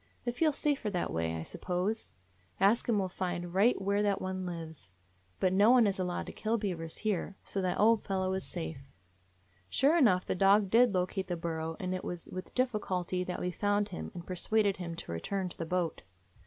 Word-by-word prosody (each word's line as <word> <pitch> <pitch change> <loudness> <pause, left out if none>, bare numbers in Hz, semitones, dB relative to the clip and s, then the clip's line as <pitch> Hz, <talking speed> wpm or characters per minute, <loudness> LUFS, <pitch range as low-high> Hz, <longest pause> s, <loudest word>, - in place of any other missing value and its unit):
They 240 - +1
feel 310 +6 +2
safer 285 -6 0
that 180 -4 -2
way, 80 0 -1
I 80 - -4
suppose. 185 - -2 0.5
Ask 210 +5 +3
Him 225 - +3
will 195 -2 +1
find 175 -1 -4
right 205 +6 +4
where 200 +1 +1
that 200 -1 +1
one 185 0 -3
lives. 160 - -7 0.5
But 185 -1 +2
no 205 +4 +5
one 245 -2 +7
is 195 -2 0
allowed 180 -1 -2
to - - -7
kill 225 +2 -1
bea 205 -4 -1
vers 165 -1 -7
here, 200 -2 -2
so 195 - -2
that 185 -1 -1
old 225 +1 +5
fellow 190 -1 -1
is 190 -1 -2
safe." 160 -4 -5 0.9
Sure 285 +5 +3
enough, 210 - +4
the - - 0
dog 195 +1 +4
did 235 -2 +5
locate 185 +1 -1
the 175 -1 -2
burrow; 165 -1 -3
and 185 0 -2
it 185 - -3
was 175 -1 -5
with 185 0 -7
difficulty 190 -7 0
that 180 - -4
we 180 - -1
found 205 +2 +1
him, 180 - -5
and 175 -1 -7
persuaded 200 +2 +1
him 170 -2 -5
to 165 - -7
return 185 - -2
to - - -13
the 165 - -3
boat. 180 -1 -1
185 Hz, 210 wpm, -31 LUFS, 175-210 Hz, 0.9 s, one